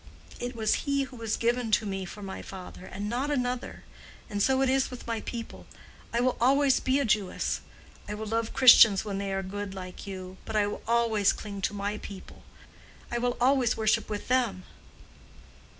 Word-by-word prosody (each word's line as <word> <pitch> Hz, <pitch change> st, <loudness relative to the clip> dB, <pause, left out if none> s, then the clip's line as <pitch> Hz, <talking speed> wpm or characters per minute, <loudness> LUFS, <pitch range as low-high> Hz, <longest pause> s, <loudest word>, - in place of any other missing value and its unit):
It 245 Hz, +1 st, -4 dB
was 220 Hz, +6 st, 0 dB
he 280 Hz, 0 st, +2 dB
who 265 Hz, -1 st, -9 dB
was 225 Hz, -2 st, -2 dB
given 240 Hz, 0 st, 0 dB
to 215 Hz, -, +3 dB
me 195 Hz, -2 st, -3 dB
for 205 Hz, +3 st, -9 dB
my 190 Hz, -1 st, -6 dB
father, 185 Hz, -1 st, -9 dB
and 200 Hz, +2 st, -5 dB
not 250 Hz, +6 st, -1 dB
another. 250 Hz, -3 st, -2 dB, 0.5 s
And 205 Hz, 0 st, -1 dB
so 265 Hz, +4 st, +3 dB
it -, -, +2 dB
is 265 Hz, 0 st, +2 dB
with 250 Hz, -, -9 dB
my 230 Hz, -2 st, -2 dB
people. 230 Hz, -2 st, -7 dB, 0.4 s
I 235 Hz, -, +1 dB
will 255 Hz, 0 st, +1 dB
always 275 Hz, +2 st, +4 dB
be 260 Hz, +1 st, +1 dB
a 280 Hz, -, +1 dB
Jewess. 210 Hz, -4 st, 0 dB, 0.5 s
I 210 Hz, -, -3 dB
will 215 Hz, +1 st, -5 dB
love 225 Hz, +1 st, -1 dB
Christians 230 Hz, -6 st, +8 dB
when 200 Hz, -2 st, -3 dB
they 200 Hz, -1 st, -3 dB
are 195 Hz, 0 st, -1 dB
good, 200 Hz, +1 st, -5 dB
like 185 Hz, +1 st, -8 dB
you. 185 Hz, -1 st, -7 dB
But 220 Hz, -, -6 dB
I 210 Hz, -1 st, +4 dB
will 205 Hz, -, -4 dB
always 230 Hz, -3 st, +3 dB
cling 200 Hz, -2 st, -7 dB
to 200 Hz, -, -1 dB
my 205 Hz, +1 st, -3 dB
people. 195 Hz, -2 st, -10 dB, 0.7 s
I 240 Hz, -, 0 dB
will 245 Hz, 0 st, 0 dB
always 255 Hz, -1 st, +3 dB
worship 220 Hz, +1 st, +1 dB
with 210 Hz, -1 st, -4 dB
them." 240 Hz, -7 st, +1 dB
220 Hz, 195 wpm, -28 LUFS, 200-245 Hz, 0.7 s, Christians